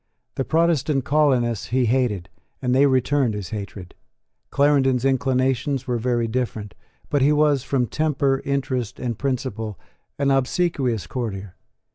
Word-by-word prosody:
The 135 Hz, -, -2 dB
Protestant 155 Hz, -4 st, +1 dB
colonists 130 Hz, -7 st, +2 dB
he 125 Hz, +2 st, +1 dB
hated; 115 Hz, -7 st, 0 dB, 0.3 s
and 125 Hz, -1 st, 0 dB
they 140 Hz, +2 st, +5 dB
returned 130 Hz, -2 st, +1 dB
his 105 Hz, -1 st, -6 dB
hatred. 100 Hz, -4 st, -7 dB, 0.6 s
Clarendon's 135 Hz, -3 st, +2 dB
inclinations 130 Hz, 0 st, +1 dB
were 125 Hz, -3 st, -1 dB
very 120 Hz, 0 st, 0 dB
different: 110 Hz, -4 st, -3 dB, 0.4 s
but 145 Hz, -, +2 dB
he 140 Hz, +3 st, +4 dB
was, 150 Hz, -2 st, +3 dB
from 130 Hz, -1 st, 0 dB
temper, 140 Hz, -1 st, 0 dB
interest, 130 Hz, -4 st, -2 dB
and 120 Hz, -2 st, -2 dB
principle, 115 Hz, -5 st, -3 dB, 0.4 s
an 140 Hz, -1 st, +1 dB
obsequious 135 Hz, -, 0 dB
courtier. 100 Hz, -7 st, -5 dB
130 Hz, 130 wpm, -23 LUFS, 115-140 Hz, 0.6 s, they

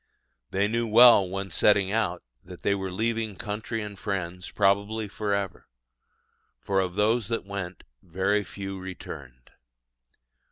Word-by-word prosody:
They 100 Hz, +2 st, +1 dB
knew 115 Hz, +2 st, -1 dB
well, 115 Hz, -4 st, +7 dB
when 95 Hz, 0 st, -4 dB
setting 100 Hz, +3 st, +3 dB
out, 100 Hz, -6 st, 0 dB, 0.2 s
that 90 Hz, 0 st, -12 dB
they 100 Hz, -, +3 dB
were 95 Hz, -1 st, -3 dB
leaving 110 Hz, +1 st, -1 dB
country 105 Hz, +3 st, -4 dB
and 100 Hz, -2 st, -8 dB
friends 90 Hz, -3 st, -4 dB
probably 100 Hz, +2 st, +1 dB
for 100 Hz, 0 st, -1 dB
ever; 100 Hz, -2 st, -4 dB, 0.9 s
for 95 Hz, -1 st, 0 dB
of 90 Hz, -2 st, -1 dB
those 110 Hz, +2 st, +2 dB
that 115 Hz, -3 st, -2 dB
went, 100 Hz, -3 st, -6 dB, 0.2 s
very 95 Hz, +4 st, 0 dB
few 95 Hz, +1 st, -6 dB
returned. 70 Hz, -9 st, -9 dB
100 Hz, 135 wpm, -27 LUFS, 95-105 Hz, 0.9 s, well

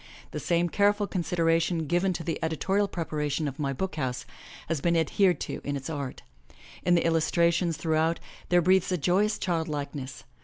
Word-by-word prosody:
The -, -, -4 dB
same 175 Hz, -1 st, +1 dB
careful 205 Hz, +3 st, +2 dB
consideration 165 Hz, -2 st, +1 dB
given 175 Hz, +4 st, +1 dB
to 165 Hz, -, -5 dB
the 165 Hz, 0 st, -2 dB
editorial 190 Hz, +6 st, +1 dB
prepara 155 Hz, -5 st, -3 dB
tion 150 Hz, +2 st, -1 dB
of 140 Hz, +2 st, -6 dB
My 140 Hz, -2 st, 0 dB
BOOK 185 Hz, +5 st, -3 dB
HOUSE 130 Hz, -4 st, -2 dB, 0.4 s
has 160 Hz, -3 st, -1 dB
been 170 Hz, +1 st, +2 dB
adhered 180 Hz, +3 st, +2 dB
to -, -, -4 dB
in 145 Hz, 0 st, -2 dB
its 135 Hz, +3 st, -6 dB
art. 140 Hz, -4 st, -5 dB, 0.6 s
In 175 Hz, 0 st, +3 dB
the 170 Hz, -, +2 dB
illustrations 170 Hz, +1 st, +2 dB
throughout 160 Hz, +1 st, +1 dB, 0.3 s
there 175 Hz, -1 st, +4 dB
breathes 185 Hz, +1 st, +3 dB
a 180 Hz, -, +1 dB
joyous 185 Hz, +7 st, +2 dB
childlikeness. 150 Hz, -6 st, -3 dB
165 Hz, 175 wpm, -27 LUFS, 155-180 Hz, 0.6 s, there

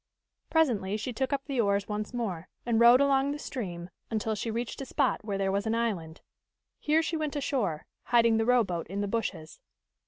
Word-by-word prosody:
Presently 220 Hz, -, +2 dB
she 230 Hz, +3 st, -4 dB
took 265 Hz, +4 st, -1 dB
up 275 Hz, -1 st, -1 dB
the 270 Hz, -4 st, 0 dB
oars 200 Hz, -1 st, +1 dB
once 210 Hz, 0 st, -3 dB
more, 195 Hz, -8 st, -4 dB, 0.2 s
and 235 Hz, -2 st, +2 dB
rowed 240 Hz, +3 st, +7 dB
along 275 Hz, 0 st, +3 dB
the -, -, -5 dB
stream 180 Hz, -, -6 dB, 0.2 s
until 220 Hz, 0 st, -1 dB
she 215 Hz, +2 st, -3 dB
reached 235 Hz, +4 st, -3 dB
a -, -, -4 dB
spot 270 Hz, -5 st, 0 dB
where 205 Hz, -2 st, -2 dB
there 195 Hz, -1 st, 0 dB
was 200 Hz, +2 st, -1 dB
an 220 Hz, -, +1 dB
island. 190 Hz, -9 st, -2 dB, 0.6 s
Here 310 Hz, +2 st, +2 dB
she 320 Hz, +1 st, -1 dB
went 305 Hz, -1 st, -3 dB
ashore, 245 Hz, -, -1 dB, 0.2 s
hiding 230 Hz, -2 st, +4 dB
the 225 Hz, -, +1 dB
rowboat 205 Hz, -10 st, +2 dB
in 195 Hz, +3 st, -3 dB
the 205 Hz, -, -1 dB
bushes. 195 Hz, -7 st, -3 dB
225 Hz, 195 wpm, -29 LUFS, 195-260 Hz, 0.6 s, rowed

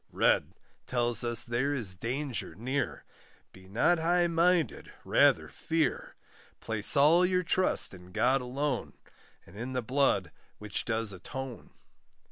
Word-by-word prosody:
Red -, -, +1 dB, 0.3 s
tells 120 Hz, -2 st, +2 dB
us 120 Hz, -1 st, +2 dB
there 125 Hz, +5 st, -1 dB
is 110 Hz, -9 st, -1 dB
danger 120 Hz, -, -4 dB
near, 130 Hz, +7 st, -3 dB, 0.5 s
Be 95 Hz, 0 st, -16 dB
not 165 Hz, -, +2 dB
high 175 Hz, +2 st, +2 dB
minded, 170 Hz, 0 st, +1 dB
rather -, -, +3 dB
fear; 160 Hz, -4 st, -2 dB, 0.4 s
Place 110 Hz, +4 st, 0 dB
all 155 Hz, +6 st, +5 dB
your 180 Hz, 0 st, +1 dB
trust 185 Hz, -, +2 dB
in 90 Hz, -1 st, -13 dB
God 125 Hz, +6 st, +2 dB
alone, 130 Hz, +1 st, -3 dB, 0.5 s
And 85 Hz, -, -17 dB
in 120 Hz, +5 st, -5 dB
the 125 Hz, -1 st, -2 dB
blood 135 Hz, +4 st, +1 dB, 0.3 s
which 105 Hz, -1 st, -4 dB
does 110 Hz, -2 st, -1 dB
atone. 125 Hz, +6 st, -8 dB
125 Hz, 130 wpm, -29 LUFS, 110-150 Hz, 0.5 s, all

